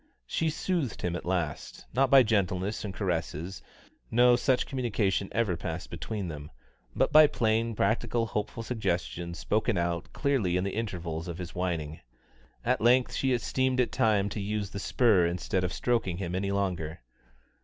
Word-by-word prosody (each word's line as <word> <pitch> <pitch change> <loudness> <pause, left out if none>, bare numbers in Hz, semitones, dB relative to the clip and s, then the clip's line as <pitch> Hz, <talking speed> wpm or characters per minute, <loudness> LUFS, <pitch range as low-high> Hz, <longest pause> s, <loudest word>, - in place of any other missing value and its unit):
She 160 - 0
soothed 155 - -2
him 90 -1 -1
at 90 - -6
last, 85 -5 -3
not 135 +1 +3
by 135 -1 +8
gentleness 100 -2 0
and 105 - -4
caresses 90 -2 -3 0.5
no 120 +1 +5
such 130 +1 +2
communication 105 -7 -1
ever 110 -6 +1
passed 85 0 -5
between 100 +3 -4
them 75 -2 -7 0.5
but - - +2
by 155 0 +8
plain, 115 -2 0
practical, 115 +3 +1
hopeful 110 +1 -3
suggestions 85 -6 -2
spoken 110 +5 0
out 85 -1 -2
clearly 125 -12 +1
in 90 - 0
the 100 - -2
intervals 85 -7 -4
of 85 -1 -5
his 90 -1 -7
whining. 80 -4 -3 0.7
At 125 +2 +1
length 125 +2 +4
she 135 - 0
esteemed 130 +1 +1
it 125 - +2
time 105 -3 +2
to 100 +1 -4
use 105 0 -2
the 100 - -5
spur 100 -5 +3
instead 90 +2 -1
of 90 - -1
stroking 115 -8 0
him 90 -2 -4
any 95 +2 -1
longer. 90 -6 -2
100 Hz, 165 wpm, -29 LUFS, 90-120 Hz, 0.7 s, by